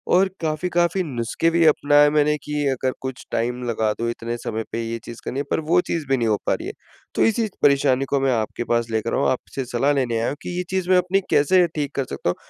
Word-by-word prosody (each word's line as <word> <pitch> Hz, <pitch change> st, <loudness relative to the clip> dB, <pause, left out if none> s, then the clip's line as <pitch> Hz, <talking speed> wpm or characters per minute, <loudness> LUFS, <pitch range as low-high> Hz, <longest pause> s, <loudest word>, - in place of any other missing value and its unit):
और 190 Hz, +2 st, +5 dB
काफ़ी-काफ़ी 175 Hz, +3 st, 0 dB
नुस्खे 130 Hz, +3 st, -1 dB
भी 170 Hz, 0 st, +3 dB
अपनाए 145 Hz, 0 st, +5 dB
मैंने 150 Hz, 0 st, +2 dB
कि 150 Hz, -, -6 dB, 0.2 s
अगर 130 Hz, 0 st, 0 dB
कुछ 130 Hz, -2 st, -6 dB
टाइम 120 Hz, +2 st, -1 dB
लगा 110 Hz, -2 st, 0 dB
दूं 115 Hz, 0 st, -1 dB
इतने 120 Hz, 0 st, -4 dB
समय 110 Hz, -1 st, -4 dB
पे 115 Hz, -, -2 dB
ये 115 Hz, 0 st, -4 dB
चीज़ 120 Hz, 0 st, -9 dB
करनी 135 Hz, -, -3 dB
है, -, -, 0 dB
पर -, -, +2 dB
वो 160 Hz, +3 st, +2 dB
चीज़ 165 Hz, -3 st, -2 dB
भी 135 Hz, -, +3 dB
नहीं 115 Hz, -2 st, 0 dB
हो 105 Hz, -, +2 dB
पा -, -, +3 dB
रही -, -, -4 dB
है, -, -, -5 dB, 0.4 s
तो -, -, +3 dB
इसी 225 Hz, 0 st, +1 dB, 0.2 s
परेशानी 135 Hz, -1 st, +3 dB
को 140 Hz, -, +2 dB
मैं 135 Hz, -1 st, +2 dB
आपके 110 Hz, +1 st, -2 dB
पास 115 Hz, -1 st, 0 dB
लेकर 110 Hz, +1 st, -1 dB
आ -, -, 0 dB
हूँ, -, -, +2 dB
आपसे 130 Hz, +1 st, -4 dB
सलाह 125 Hz, +4 st, +1 dB
लेने 120 Hz, -5 st, 0 dB
आया 115 Hz, -, 0 dB
हूँ 145 Hz, -, -4 dB
कि 175 Hz, -, -5 dB
ये 180 Hz, -, -1 dB
चीज़ 185 Hz, -1 st, -1 dB
मैं 185 Hz, -, +6 dB
अपनी 185 Hz, +2 st, +1 dB
कैसे 180 Hz, +5 st, +4 dB
ठीक 145 Hz, -2 st, -3 dB
कर 135 Hz, -, -1 dB
सकता 90 Hz, -, -3 dB
हूँ? 90 Hz, -, 0 dB
135 Hz, 255 wpm, -22 LUFS, 120-160 Hz, 0.4 s, मैं